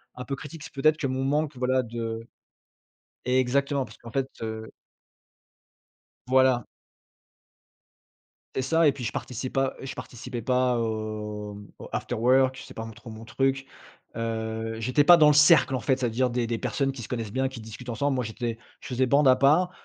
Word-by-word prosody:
un 125 Hz, -, -6 dB
peu 135 Hz, +1 st, -4 dB
critique. 150 Hz, +1 st, -9 dB
C'est -, -, -10 dB
peut-être 155 Hz, +3 st, +3 dB
que 150 Hz, -3 st, -2 dB
mon 130 Hz, +1 st, -2 dB
manque, 145 Hz, 0 st, 0 dB
voilà, 130 Hz, +1 st, +1 dB
de 115 Hz, -1 st, -5 dB, 1.0 s
exactement, 130 Hz, +2 st, +1 dB
parce -, -, -15 dB
qu'en 115 Hz, -, -11 dB
fait, 135 Hz, +1 st, -1 dB
heu 110 Hz, 0 st, -5 dB, 1.6 s
Voilà. 130 Hz, -2 st, +3 dB, 1.9 s
C'est 130 Hz, -, 0 dB
ça, 160 Hz, +3 st, +3 dB
et -, -, +4 dB
puis, 130 Hz, -, -7 dB
je 110 Hz, -, -2 dB
participe 125 Hz, +1 st, -5 dB
pas, 135 Hz, -1 st, 0 dB
heu, -, -, -9 dB
je -, -, -5 dB
participais 120 Hz, 0 st, -7 dB
pas 125 Hz, 0 st, +2 dB
aux 105 Hz, -2 st, -4 dB, 0.2 s
aux -, -, -9 dB
afterworks. 130 Hz, +2 st, +2 dB
J -, -, -9 dB
c'est -, -, -12 dB
pas 115 Hz, -, -5 dB
m 115 Hz, -, -9 dB
trop 115 Hz, +1 st, -12 dB
mon 110 Hz, +1 st, -9 dB
truc. 135 Hz, +3 st, 0 dB, 0.5 s
Heu, 115 Hz, 0 st, -3 dB
j'étais 130 Hz, +6 st, +2 dB
pas 175 Hz, +3 st, +8 dB
dans 155 Hz, -, +7 dB
le 150 Hz, -, +5 dB
cercle, 150 Hz, -3 st, +6 dB
en 130 Hz, -, 0 dB
fait. 130 Hz, +2 st, +1 dB
C'est-à-dire 125 Hz, 0 st, 0 dB
des 120 Hz, 0 st, -1 dB
des 115 Hz, 0 st, -1 dB
personnes 135 Hz, +6 st, -1 dB
qui 130 Hz, -3 st, -8 dB
se -, -, -8 dB
connaissent 115 Hz, -4 st, -4 dB
bien, 130 Hz, +1 st, 0 dB
qui 130 Hz, -3 st, -9 dB
discutent 110 Hz, +3 st, -9 dB
ensemble. 140 Hz, +4 st, 0 dB
Moi, 125 Hz, -1 st, -1 dB
j'étais 115 Hz, +1 st, -4 dB, 0.2 s
je -, -, -10 dB
faisais 130 Hz, 0 st, +1 dB
bande 140 Hz, +2 st, +4 dB
à 130 Hz, -, +7 dB
part 155 Hz, +7 st, +4 dB
125 Hz, 190 wpm, -26 LUFS, 115-135 Hz, 1.9 s, pas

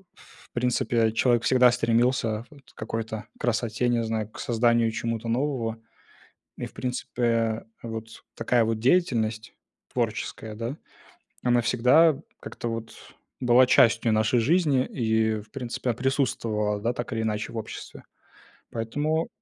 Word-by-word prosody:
в -, -, -20 dB
принципе, 120 Hz, -2 st, +1 dB
человек 120 Hz, +1 st, +2 dB
всегда 125 Hz, -1 st, +5 dB
стремился 115 Hz, -1 st, +1 dB
вот 140 Hz, -3 st, -18 dB
к -, -, -36 dB
какой-то 110 Hz, 0 st, -4 dB
красоте, 120 Hz, 0 st, 0 dB
не 120 Hz, -1 st, +1 dB
знаю, 110 Hz, -1 st, -2 dB
к -, -, -13 dB
созданию 115 Hz, -1 st, +2 dB
чему-то 115 Hz, 0 st, -3 dB
нового. 120 Hz, -3 st, -1 dB, 0.8 s
И, -, -, -4 dB
в -, -, -11 dB
принципе, 115 Hz, -3 st, -1 dB, 0.2 s
вот 110 Hz, -1 st, -5 dB, 0.3 s
такая 120 Hz, -2 st, +2 dB
вот 110 Hz, 0 st, -1 dB
деятельность 115 Hz, -6 st, +1 dB, 0.4 s
творческая, 110 Hz, -2 st, -3 dB
да, 120 Hz, +7 st, -4 dB, 0.7 s
она 120 Hz, -1 st, +4 dB
всегда 125 Hz, +6 st, +4 dB, 0.2 s
как-то 120 Hz, -, -6 dB
вот 115 Hz, 0 st, -5 dB, 0.5 s
была 125 Hz, 0 st, +5 dB
частью 115 Hz, -2 st, +4 dB
нашей 110 Hz, +3 st, +2 dB
жизни 145 Hz, 0 st, +3 dB
и, 110 Hz, -2 st, 0 dB
в 105 Hz, +1 st, -16 dB
принципе, 125 Hz, -1 st, -3 dB
она 115 Hz, -, -2 dB
присутствовала, 115 Hz, -6 st, 0 dB
да, 115 Hz, +3 st, 0 dB
так 120 Hz, 0 st, -5 dB
или 115 Hz, 0 st, -1 dB
иначе 105 Hz, -1 st, -2 dB
в -, -, -8 dB
обществе. 110 Hz, -, -7 dB, 0.7 s
Поэтому, 145 Hz, +8 st, -1 dB
115 Hz, 135 wpm, -26 LUFS, 110-125 Hz, 0.8 s, всегда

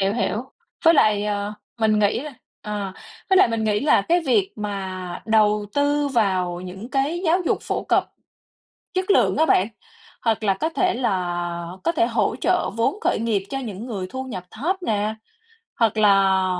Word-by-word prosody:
Hiểu, 195 Hz, +1 st, +2 dB
hiểu. 230 Hz, -1 st, -1 dB, 0.4 s
Với 330 Hz, +1 st, +7 dB
lại, 210 Hz, -7 st, +3 dB
ờ, 205 Hz, 0 st, -2 dB, 0.3 s
mình 215 Hz, -1 st, +3 dB
nghĩ 210 Hz, +2 st, +2 dB
là 295 Hz, 0 st, -8 dB, 0.3 s
ờ, 205 Hz, -3 st, -4 dB, 0.4 s
với 380 Hz, -, +5 dB
lại 370 Hz, -, +6 dB
mình 225 Hz, -1 st, -1 dB
nghĩ 210 Hz, -1 st, +1 dB
là 285 Hz, -8 st, +4 dB
cái 345 Hz, -, +2 dB
việc 385 Hz, +9 st, +2 dB
mà 190 Hz, -4 st, -5 dB
đầu 210 Hz, -1 st, +3 dB
tư 290 Hz, 0 st, +2 dB
vào 185 Hz, -8 st, 0 dB
những 190 Hz, +5 st, -8 dB
cái 285 Hz, +5 st, 0 dB
giáo 335 Hz, +3 st, +3 dB
dục -, -, +2 dB
phổ -, -, -2 dB
cập -, -, +2 dB, 0.9 s
chất 375 Hz, +1 st, 0 dB
lượng -, -, +3 dB
á 320 Hz, -, +4 dB
bạn, 195 Hz, -9 st, +3 dB, 0.5 s
hoặc 225 Hz, -2 st, 0 dB
là 200 Hz, -2 st, +3 dB
có 255 Hz, +12 st, -2 dB
thể 365 Hz, +2 st, +1 dB
là 175 Hz, -5 st, -2 dB
có 335 Hz, -, +2 dB
thể 265 Hz, -9 st, +2 dB
hỗ 230 Hz, -1 st, 0 dB
trợ 360 Hz, 0 st, +1 dB
vốn 270 Hz, -, +1 dB
khởi -, -, +1 dB
nghiệp 220 Hz, -4 st, 0 dB
cho 270 Hz, -, -3 dB
những 225 Hz, -3 st, -6 dB
người 200 Hz, -7 st, -4 dB
thu 260 Hz, +4 st, -5 dB
nhập 230 Hz, -9 st, -6 dB
thấp 320 Hz, -, -1 dB
nè, 215 Hz, -4 st, 0 dB, 0.6 s
hoặc 225 Hz, -2 st, +2 dB
là 195 Hz, -2 st, +4 dB
215 Hz, 185 wpm, -22 LUFS, 195-270 Hz, 0.9 s, Với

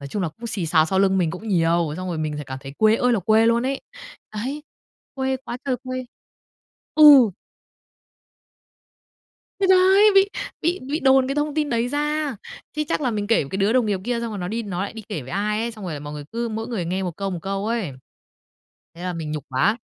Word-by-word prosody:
nói 140 Hz, -, -7 dB
chung 200 Hz, +3 st, -3 dB
là 170 Hz, -, 0 dB
cũng 230 Hz, +10 st, -9 dB
xì 200 Hz, -7 st, -3 dB
xào 155 Hz, 0 st, +4 dB
sau 190 Hz, +3 st, 0 dB
lưng 190 Hz, -1 st, +3 dB
mình 165 Hz, -3 st, +1 dB
cũng 205 Hz, +5 st, -7 dB
nhiều, 170 Hz, -3 st, +2 dB
xong 185 Hz, 0 st, -5 dB
rồi 165 Hz, -3 st, -3 dB
mình 155 Hz, -1 st, -2 dB
th -, -, -4 dB
cảm 130 Hz, -1 st, -6 dB
thấy 135 Hz, 0 st, -9 dB
quê 220 Hz, +1 st, +5 dB
ơi 250 Hz, 0 st, +2 dB
là 215 Hz, -, +1 dB
quê 220 Hz, +4 st, +4 dB
luôn 235 Hz, +2 st, +2 dB
ấy. 275 Hz, 0 st, -2 dB, 0.5 s
Đấy, 270 Hz, +8 st, -4 dB, 0.5 s
quê 265 Hz, 0 st, -1 dB
quá 240 Hz, -, -5 dB
trời 260 Hz, -2 st, 0 dB
quê 255 Hz, 0 st, -4 dB, 0.9 s
ừ! 285 Hz, -8 st, +8 dB, 2.3 s
Thì 385 Hz, -, +3 dB
đấy! 380 Hz, +3 st, +6 dB
Bị 390 Hz, +1 st, +6 dB, 0.3 s
bị 345 Hz, +3 st, 0 dB
bị 305 Hz, +3 st, -1 dB
đồn 265 Hz, -1 st, +4 dB
cái 275 Hz, -, -1 dB
thông 295 Hz, 0 st, -1 dB
tin 300 Hz, -3 st, 0 dB
đấy 235 Hz, +1 st, 0 dB
ra, 295 Hz, -2 st, -1 dB, 0.4 s
chứ 305 Hz, -, -1 dB
chắc -, -, 0 dB
là 255 Hz, -4 st, 0 dB
mình 205 Hz, -2 st, -2 dB
kể 225 Hz, -6 st, +3 dB
với 140 Hz, -, -9 dB
cái 190 Hz, -, -3 dB
đứa 200 Hz, +3 st, +2 dB
đồng 250 Hz, -3 st, +3 dB
nghiệp 200 Hz, -3 st, -1 dB
kia 240 Hz, -1 st, -1 dB
xong 230 Hz, -1 st, -3 dB
rồi 205 Hz, -, -5 dB
nó 180 Hz, 0 st, -4 dB
đi 230 Hz, +2 st, -2 dB
nó 190 Hz, -3 st, -3 dB
lại 200 Hz, -, -4 dB
đi 225 Hz, -1 st, -8 dB
kể 170 Hz, -8 st, -3 dB
với 125 Hz, -, -10 dB
ai 210 Hz, +3 st, -1 dB
ấy, 235 Hz, +1 st, -2 dB
xong 215 Hz, -4 st, -10 dB
rồi 170 Hz, -4 st, -4 dB
là 145 Hz, -, -6 dB
mọi 145 Hz, 0 st, -7 dB
người 145 Hz, -1 st, -7 dB
cứ 235 Hz, 0 st, -2 dB
mỗi 225 Hz, +1 st, -4 dB
người 210 Hz, -8 st, -2 dB
nghe 185 Hz, +3 st, -2 dB
1 175 Hz, -3 st, -4 dB
câu, 195 Hz, -1 st, -3 dB
1 175 Hz, -, -3 dB
câu 195 Hz, +1 st, -3 dB
ấy, 225 Hz, -10 st, -2 dB, 1.0 s
thế 175 Hz, -, -10 dB
là 180 Hz, -1 st, -2 dB
mình 160 Hz, -2 st, -5 dB
nhục 150 Hz, -2 st, -4 dB
quá. 205 Hz, -, +1 dB
215 Hz, 245 wpm, -23 LUFS, 180-255 Hz, 2.3 s, ừ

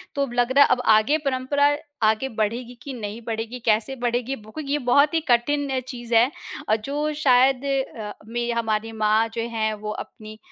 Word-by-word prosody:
तो 280 Hz, -, 0 dB
अब 275 Hz, -3 st, -2 dB
लग 245 Hz, +1 st, +1 dB
रहा 280 Hz, +2 st, +7 dB
है -, -, +2 dB
अब 250 Hz, -, +3 dB
आगे 215 Hz, +9 st, +3 dB
परंपरा 285 Hz, +1 st, +1 dB, 0.3 s
आगे 220 Hz, +4 st, +1 dB
बढ़ेगी 230 Hz, +3 st, -2 dB
कि 275 Hz, -, -7 dB
नहीं 215 Hz, -1 st, -6 dB
बढ़ेगी, 225 Hz, +2 st, -4 dB
कैसे 225 Hz, +3 st, +1 dB
बढ़ेगी, 245 Hz, +2 st, -1 dB
वो 215 Hz, -1 st, -15 dB
ये 280 Hz, +1 st, 0 dB
बहुत 280 Hz, +4 st, +3 dB
ही 330 Hz, -, +3 dB
कठिन 270 Hz, +2 st, +2 dB
चीज़ 240 Hz, -2 st, -6 dB
है। 235 Hz, +3 st, +5 dB, 0.4 s
और 215 Hz, -, +5 dB
जो 295 Hz, +2 st, -2 dB
शायद 260 Hz, -1 st, +4 dB
अ, 265 Hz, -6 st, -2 dB
में 240 Hz, +1 st, -2 dB
हमारी 225 Hz, -1 st, -1 dB
माँ 220 Hz, 0 st, +2 dB
जो 230 Hz, -, -2 dB
हैं 220 Hz, -1 st, -1 dB
वो 210 Hz, 0 st, -5 dB
अपनी 215 Hz, 0 st, -9 dB
240 Hz, 190 wpm, -23 LUFS, 220-270 Hz, 0.4 s, रहा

